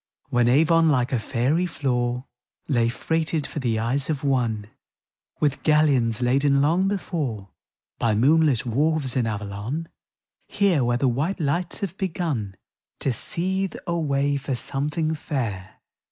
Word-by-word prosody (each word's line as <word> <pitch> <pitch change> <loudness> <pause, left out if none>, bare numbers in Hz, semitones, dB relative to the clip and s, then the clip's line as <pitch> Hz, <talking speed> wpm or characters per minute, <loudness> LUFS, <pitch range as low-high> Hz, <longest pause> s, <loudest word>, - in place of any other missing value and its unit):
When 120 -3 +2
Avon, 160 +5 +4
like 130 -3 +1
a 125 - +2
faery 135 - 0
floor, 125 -5 -1 0.4
Lay 120 -5 +2
freighted, 160 +3 -1
for - - -5
the 120 -5 0
eyes 125 +6 0
of 150 -3 -2
One, 120 -6 0 0.7
With 145 -2 0
galleons 135 -7 +3
laden 140 +3 +3
long 165 +7 +2
before 145 - -3 0.5
By 110 -2 +2
moonlit 140 +1 +3
wharves 140 +3 0
in 125 -3 +1
Avalon 105 +9 -4 0.3
— - - -66 0.2
Here, 190 -9 +2
where 120 0 +1
the 135 - +1
white 145 +11 -1
lights 165 +3 -1
have 190 -3 -3
begun 160 - -2 0.5
To 135 - +1
seethe 190 - -2
a 170 - -1
way 140 -2 +1
for 135 -1 -3
something 150 +6 -1
fair. 115 -11 -4
140 Hz, 140 wpm, -24 LUFS, 120-160 Hz, 0.7 s, Avon